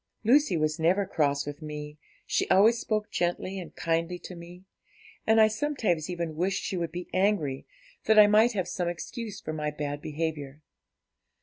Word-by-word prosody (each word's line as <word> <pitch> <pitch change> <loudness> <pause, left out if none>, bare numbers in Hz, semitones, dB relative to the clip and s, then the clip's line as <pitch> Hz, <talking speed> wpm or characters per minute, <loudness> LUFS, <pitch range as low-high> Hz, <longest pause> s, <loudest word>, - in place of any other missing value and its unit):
'Lucy 240 - +4
was 155 +1 0
never 180 +5 +2
cross 145 -6 0
with 145 +2 -7
me, 150 -1 -7 0.3
she - - 0
always 225 +5 +5
spoke 215 -2 -2
gently 180 +2 -2
and 180 - -10
kindly 165 +1 -1
to 180 - -10
me; 175 +2 -12 0.6
and 220 0 +5
I 220 - +7
sometimes 215 - -1
even 170 -3 -3
wished 185 +4 -1
she - - -3
would 170 -2 -2
be 175 0 -6
angry, 185 -9 0 0.4
that 220 0 +4
I 210 - +10
might 215 +3 +4
have 190 -4 -2
some 175 -2 -2
excuse 210 +4 -6
for 155 - -5
my 150 -1 -2
bad 145 -1 -4
behaviour. 150 -2 -4
175 Hz, 175 wpm, -28 LUFS, 155-205 Hz, 0.6 s, I